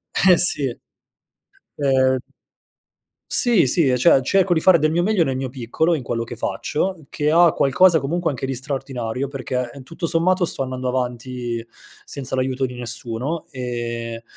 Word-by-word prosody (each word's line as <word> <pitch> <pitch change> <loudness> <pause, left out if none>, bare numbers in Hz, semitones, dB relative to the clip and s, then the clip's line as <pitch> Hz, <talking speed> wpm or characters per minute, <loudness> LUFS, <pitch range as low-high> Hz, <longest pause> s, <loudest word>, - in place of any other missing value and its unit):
Eh 180 -2 +5
sì. 140 -8 +2 1.1
Ehm 130 -2 +3 1.1
Sì, 235 - +3
sì, 145 +2 +3
e 125 - +2
cioè 135 +1 +5
cerco 190 +5 +2
di 160 - 0
fare 180 -1 +6
del 155 +1 +2
mio 170 +2 +1
meglio 195 -4 +2
nel 135 - -1
mio 130 0 -3
piccolo 135 +7 0
in 150 - -4
quello 115 -1 -3
che 115 0 -8
faccio, 185 - -2
che 150 0 -1
ha 170 +1 +5
qualcosa 160 +6 +4
comunque 165 +5 -1
anche 135 -1 -4
di 135 - -2
straordinario, 130 -2 -4
perché 130 -2 -3
tutto 165 +5 -5
sommato 175 +2 +2
sto 135 - -1
andando 130 0 -4
avanti 125 -1 -3 0.4
senza 135 -2 -5
l'aiuto 130 0 -1
di 125 -1 -6
nessuno, 120 +6 -3
e, 120 -2 -5
135 Hz, 160 wpm, -21 LUFS, 125-165 Hz, 1.1 s, fare